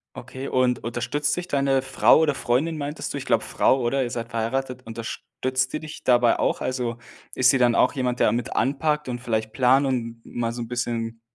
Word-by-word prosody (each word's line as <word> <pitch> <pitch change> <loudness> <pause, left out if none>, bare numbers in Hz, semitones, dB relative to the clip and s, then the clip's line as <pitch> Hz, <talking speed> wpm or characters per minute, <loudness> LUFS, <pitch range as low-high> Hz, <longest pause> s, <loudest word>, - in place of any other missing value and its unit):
Okay, 130 +1 -7
und 125 -2 +1
unterstützt 125 +6 -1
sich 180 0 -3
deine 135 -3 +1
Frau- 135 - +4
oder 155 -2 +2
Freundin, 140 +5 0
meintest 145 +2 -4
du, - - -3
ich 135 - -8
glaube 115 -1 +2
Frau 135 - +2
oder 130 +2 0
ihr 120 - -3
seid 115 0 -5
verheiratet- 125 +3 -2
unterstützt 130 +3 -3
die 155 - -3
dich 155 -1 -9
dabei 120 -2 +4
auch? - - 0
Also, 125 -2 -2 0.4
ist 130 0 +5
sie 135 - +1
dann 120 -2 +4
auch - - +3
jemand, 125 -3 -1
der - - +4
mit 120 0 -3
anpackt 150 +2 0
und 120 -1 -4
vielleicht 110 -2 -2
Plan 130 +3 +4
und 115 -3 -2
mal 115 -1 -3
so 120 0 -5
'n - - -8
bisschen, 115 -1 -3
125 Hz, 205 wpm, -24 LUFS, 120-135 Hz, 0.4 s, ist